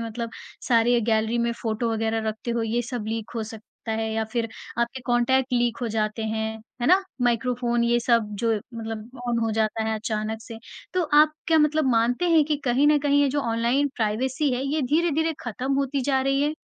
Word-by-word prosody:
मतलब 230 Hz, 0 st, -4 dB, 0.4 s
सारे 240 Hz, 0 st, +4 dB
गैलरी 220 Hz, +1 st, +1 dB
में 235 Hz, 0 st, +1 dB
फ़ोटो 225 Hz, +1 st, -1 dB
वगैरह 225 Hz, 0 st, -1 dB
रखते 220 Hz, +2 st, -4 dB
हो 235 Hz, -1 st, 0 dB
ये 230 Hz, +2 st, 0 dB
सब 240 Hz, -2 st, -5 dB
लीक 225 Hz, -1 st, -4 dB
हो 230 Hz, -, -2 dB
सकता 220 Hz, +1 st, -8 dB
है 220 Hz, 0 st, -2 dB
या 220 Hz, 0 st, 0 dB
फिर 235 Hz, -2 st, -1 dB, 0.3 s
आपके 235 Hz, +2 st, -1 dB
कॉन्टैक्ट 250 Hz, +2 st, +2 dB
लीक 240 Hz, -1 st, +1 dB
हो -, -, 0 dB
जाते 215 Hz, 0 st, -1 dB
हैं, 220 Hz, 0 st, -2 dB, 0.2 s
है 240 Hz, -, 0 dB
ना? 370 Hz, +3 st, +5 dB, 0.2 s
माइक्रोफ़ोन 240 Hz, 0 st, +1 dB
ये 240 Hz, 0 st, +3 dB
सब 230 Hz, -3 st, +2 dB
जो 230 Hz, -1 st, +3 dB, 0.2 s
मतलब 225 Hz, +2 st, -7 dB
ऑन 235 Hz, -, +1 dB
हो 225 Hz, -1 st, 0 dB
जाता 220 Hz, 0 st, 0 dB
है 220 Hz, 0 st, 0 dB
अचानक 215 Hz, 0 st, -3 dB
से, 225 Hz, -1 st, -9 dB, 0.4 s
तो 365 Hz, -, +2 dB, 0.2 s
आप 305 Hz, 0 st, +4 dB
क्या 320 Hz, -1 st, +4 dB
मतलब 305 Hz, 0 st, +3 dB
मानते 245 Hz, +8 st, +2 dB
हैं 320 Hz, -2 st, +5 dB
कि 300 Hz, 0 st, 0 dB
कहीं 260 Hz, +3 st, +3 dB
न 300 Hz, 0 st, +5 dB
कहीं 285 Hz, 0 st, +3 dB
ये 285 Hz, -, +3 dB
जो 285 Hz, +2 st, 0 dB
ऑनलाइन 235 Hz, +4 st, +1 dB
प्राइवेसी 255 Hz, +6 st, 0 dB
है 250 Hz, -, -2 dB
ये 300 Hz, +2 st, 0 dB
धीरे-धीरे 320 Hz, +3 st, +1 dB
खत्म 250 Hz, +3 st, -3 dB
होती 275 Hz, 0 st, 0 dB
जा 265 Hz, 0 st, +1 dB
रही 275 Hz, +1 st, +1 dB
है? 300 Hz, +1 st, 0 dB
235 Hz, 205 wpm, -25 LUFS, 225-270 Hz, 0.4 s, ना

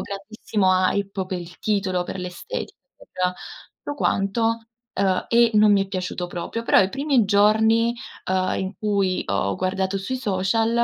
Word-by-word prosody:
grandissima 195 Hz, -2 st, 0 dB
hype 200 Hz, -1 st, -2 dB
per 185 Hz, -1 st, -3 dB
il 175 Hz, +1 st, -11 dB
titolo, 195 Hz, -4 st, 0 dB
per 190 Hz, -, -6 dB
l'estetica, 180 Hz, -, -6 dB, 0.2 s
per -, -, -17 dB, 0.7 s
tutto 290 Hz, -, -7 dB
quanto, 200 Hz, -2 st, 0 dB, 0.5 s
uhm, 190 Hz, -1 st, +1 dB
e 235 Hz, 0 st, +5 dB
non 210 Hz, 0 st, +6 dB
mi 200 Hz, -1 st, +4 dB
è -, -, -14 dB
piaciuto 180 Hz, -1 st, -3 dB
proprio. 175 Hz, +6 st, -5 dB
Però, -, -, +4 dB
i 190 Hz, -, +2 dB
primi 275 Hz, -3 st, +2 dB
giorni, 220 Hz, +3 st, +3 dB, 0.4 s
uhm, 185 Hz, 0 st, +1 dB
in 190 Hz, 0 st, -3 dB
cui 200 Hz, -4 st, 0 dB
ho 100 Hz, 0 st, 0 dB
guardato 190 Hz, +1 st, -1 dB
sui 230 Hz, +7 st, -3 dB
social, 215 Hz, 0 st, 0 dB
195 Hz, 155 wpm, -23 LUFS, 185-220 Hz, 0.7 s, non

